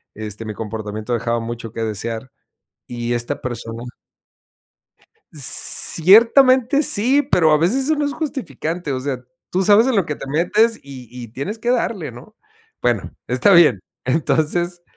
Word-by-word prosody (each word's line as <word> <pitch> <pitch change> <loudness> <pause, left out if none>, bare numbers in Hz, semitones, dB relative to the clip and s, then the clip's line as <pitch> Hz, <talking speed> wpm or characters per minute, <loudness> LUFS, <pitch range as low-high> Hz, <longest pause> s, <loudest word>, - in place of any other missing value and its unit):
este, 105 0 -7
mi 110 -1 -6
comportamiento 110 +1 -5
dejaba 115 0 -1
mucho 115 -1 -6
que 115 - -4
desear 115 +3 -5 0.6
y 120 0 -3
esta 120 0 -3
persona 115 -2 -6 1.5
Ciertamente 230 - +4
sí, 260 +3 +3
pero 170 - +2
a 150 - +4
veces 210 - +1
eso 310 +3 +2
no 295 0 0
es 285 - -3
justificante. 175 - -4
O 130 - -3
sea, 130 -2 -4 0.3
tú 185 - 0
sabes 210 +4 +5
en 260 -3 +1
lo 195 -5 +1
que 150 - -4
te - - -9
metes 210 +10 +1
y 135 -3 -11
y 120 -1 -9
tienes 140 - -6
que 235 +2 -2
darle, 225 - -1
¿no?, 125 - -14 0.5
bueno, - - -1 0.2
está 205 - +2
bien. 155 - +5 0.2
Entonces, 165 +5 -1
150 Hz, 150 wpm, -19 LUFS, -, 1.5 s, sabes